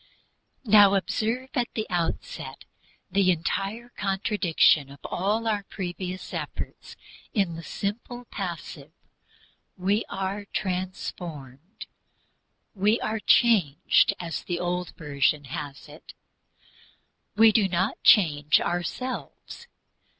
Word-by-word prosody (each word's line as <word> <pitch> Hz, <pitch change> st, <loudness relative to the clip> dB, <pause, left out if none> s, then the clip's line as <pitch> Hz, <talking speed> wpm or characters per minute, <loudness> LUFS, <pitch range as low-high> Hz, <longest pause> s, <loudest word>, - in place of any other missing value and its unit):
Now 205 Hz, -2 st, +7 dB
observe 225 Hz, +7 st, -1 dB
at 245 Hz, -2 st, +1 dB
the 220 Hz, -, -1 dB
outset 175 Hz, -, -3 dB, 0.5 s
the 195 Hz, -1 st, +3 dB
entire 195 Hz, +7 st, -1 dB
contradiction 190 Hz, -7 st, +2 dB
of 140 Hz, -, -12 dB
all 210 Hz, +5 st, -1 dB
our 210 Hz, -2 st, +1 dB
previous 185 Hz, -1 st, -6 dB
efforts, -, -, -6 dB, 0.4 s
in 195 Hz, -5 st, +1 dB
the 165 Hz, -, -7 dB
simple 230 Hz, +8 st, -5 dB
passive: 165 Hz, -6 st, -6 dB, 0.9 s
"We 200 Hz, +4 st, +1 dB
are 195 Hz, +2 st, -3 dB
transformed." 180 Hz, -, -5 dB, 0.9 s
We 210 Hz, +3 st, +2 dB
are 220 Hz, 0 st, -1 dB
changed, 205 Hz, -, +4 dB
as 165 Hz, -4 st, -4 dB
the 175 Hz, -1 st, -3 dB
Old 180 Hz, 0 st, -2 dB
Version 145 Hz, -2 st, +1 dB
has 145 Hz, 0 st, -7 dB
it 150 Hz, +2 st, -13 dB, 1.2 s
we 220 Hz, +1 st, +7 dB
do 210 Hz, -2 st, +3 dB
not 185 Hz, +2 st, -1 dB
change 150 Hz, -7 st, +5 dB
ourselves. 250 Hz, -, -4 dB
190 Hz, 100 wpm, -26 LUFS, 165-210 Hz, 1.2 s, Now